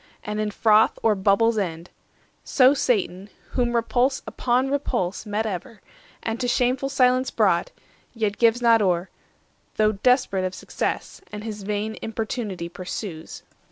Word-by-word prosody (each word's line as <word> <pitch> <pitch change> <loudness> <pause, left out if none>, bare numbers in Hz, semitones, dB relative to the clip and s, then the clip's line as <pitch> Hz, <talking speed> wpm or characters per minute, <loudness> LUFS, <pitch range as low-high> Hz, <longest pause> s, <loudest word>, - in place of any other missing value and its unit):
and 210 0 -4
in 215 0 0
froth 215 +1 +3
or 225 - +4
bubbles 210 +3 +2
end— 170 -3 -4 0.5
20 - - -41
So 260 0 +5
Satan, 200 -7 -1 0.2
whom 240 -2 0
repulse 245 +3 +1
upon 255 +2 0
repulse 235 -9 -2
Met 210 +2 -1
ever, 215 +3 -5 0.4
and 225 0 -3
to 250 - -1
shameful 250 +2 +1
silence 255 -1 +3
brought, - - +2 0.4
Yet 215 -3 -2
gives 235 +1 +3
not 230 -1 +5
o'er, 180 -2 0 0.6
though 215 0 +3
desperate 215 -2 +2
of 185 0 -3
success, - - -4
And 210 0 -7
his 215 -2 -6
vain 210 +2 -3
importunity 220 -5 -4
pursues. 175 -1 -7
220 Hz, 145 wpm, -24 LUFS, 200-245 Hz, 0.6 s, So